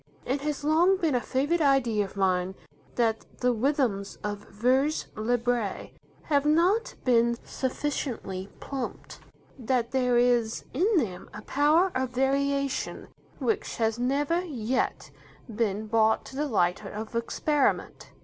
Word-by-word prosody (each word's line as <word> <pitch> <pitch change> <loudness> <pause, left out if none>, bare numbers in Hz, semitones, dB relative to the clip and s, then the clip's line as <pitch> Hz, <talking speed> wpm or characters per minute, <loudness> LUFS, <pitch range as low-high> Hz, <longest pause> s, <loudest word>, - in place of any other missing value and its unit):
It 275 +2 -1
has 295 0 -3
long 335 +6 +4
been 325 -6 0
a 245 - +1
favourite 290 +8 0
idea 255 -7 +3
of 195 - -12
mine 185 -1 +1 0.4
that 225 -2 +1 0.2
the 250 0 +3
rhythms 235 -5 0
of 205 -1 -3
'vers 260 +8 +1
libre' 235 -1 -1 0.3
have 285 -3 +2
not 345 +10 +2
been 235 -1 +3
sufficiently 250 -8 -3
plumbed, 270 -3 -6 0.4
that 240 -1 0
there 250 -2 +2
is 240 -2 +2
in 375 - +2
them 195 - -2
a 210 - -8
power 310 +6 +3
of 260 0 -1
variation 275 +1 -1 0.3
which 430 -2 -1
has 225 0 0
never 285 +7 +1
yet 255 -6 -2 0.4
been 215 -2 -1
brought 220 0 +2
to 265 - -10
the 295 +2 -1
light 180 -5 +1
of 215 +3 -7
experiment. 275 +5 0
250 Hz, 130 wpm, -27 LUFS, 220-290 Hz, 0.4 s, long